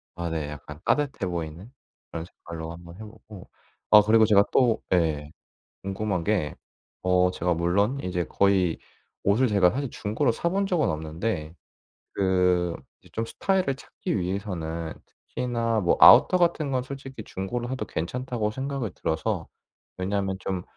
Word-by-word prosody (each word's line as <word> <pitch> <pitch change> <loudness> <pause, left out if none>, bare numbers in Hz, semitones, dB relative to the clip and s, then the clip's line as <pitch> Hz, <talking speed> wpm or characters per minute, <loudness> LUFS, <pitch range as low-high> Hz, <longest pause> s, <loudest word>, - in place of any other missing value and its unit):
아 85 0 -3
네. 80 -3 -3
약간 75 0 -9
따뜻해 140 -9 0
보이는 85 +4 -5 0.4
그런 80 0 -5
색깔로 85 -2 -8
한번 85 0 -11
해보고. 110 -1 -12 0.4
아 105 - +10
그리고 110 +1 +6
제가 100 -2 +6
또 120 -4 +3
예 75 -4 +1 0.5
궁금한 95 -2 -2
게 90 -8 0 0.5
어 90 0 +4
제가 90 -1 -1
물론 100 +10 +1
인제 90 -4 -2
거의 95 -4 +2 0.5
옷을 110 +6 +4
제가 100 -6 +4
사실 135 +3 -3
중고로 110 +2 0
사 170 - -1
본 195 +3 0
적은 175 -5 +1
없는데 80 +1 -3 0.6
그 90 -3 +2 0.3
이제 - - -19
좀 115 - -2
스타일을 185 +4 0
찾기 105 - -4
위해서는 85 -4 -3
특히나 115 -2 -2
뭐 90 -4 +2
아우터 185 - +8
같은 170 -4 +1
건 130 -2 0
솔직히 135 -3 -8
중고로 115 +6 -4
사도 130 +1 -3
괜찮다고 115 +5 -2
생각이 130 -2 -3
들어서. 80 0 -2 0.5
왜냐면 95 0 -1
좀 95 -2 -3
100 Hz, 300 characters per minute, -26 LUFS, 85-120 Hz, 0.6 s, 아